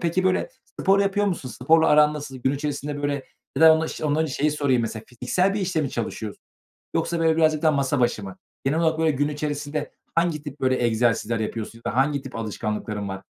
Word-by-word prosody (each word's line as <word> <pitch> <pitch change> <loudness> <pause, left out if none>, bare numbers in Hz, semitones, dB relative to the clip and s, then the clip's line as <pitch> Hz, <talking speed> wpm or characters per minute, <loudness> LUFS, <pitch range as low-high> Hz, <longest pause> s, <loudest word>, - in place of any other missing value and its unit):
peki, 175 +2 0
böyle, 185 - +2 0.3
spor 195 +1 +4
yapıyor 200 +1 +1
musun? 170 -9 -2
Sporla 160 +7 +3
aran 150 0 +5
nasıl? 145 -3 -6
Gün 130 +2 0
içerisinde, 145 0 -3
böyle 145 -1 -1 0.3
Ya - - +3
da 160 - +9
ondan 160 0 0
şe - - -7
önce - - -2
ondan 150 +1 +2
önce 155 -4 -3
şeyi 150 +3 +1
sorayım, 140 -5 +1
mesela, 110 -1 -4
fiziksel 130 - 0
bir 210 - -1
işte 180 -4 0
mi 140 - -2
çalışıyorsun 110 -2 -5 0.5
yoksa, 165 +1 0
böyle, 160 -1 +3
birazcık 155 -2 +3
daha 155 - +4
masa 140 -1 0
başı 120 -3 +1
mı? 95 -1 -8 0.3
Genel 145 +4 +1
olarak, 160 -1 +1
böyle, 160 -1 +3
gün 145 +1 0
içerisinde 150 0 -3 0.2
hangi 165 -3 +1
tip, 145 -1 -8
böyle, 130 -1 +2
egzersizler 115 0 +1
yapıyorsun 110 +1 -4
ya - - 0
da - - -5
hangi 140 +1 +2
tip 135 - -10
alışkanlıkların 105 -1 -3
var? 95 0 -6
145 Hz, 220 wpm, -24 LUFS, 125-160 Hz, 0.5 s, da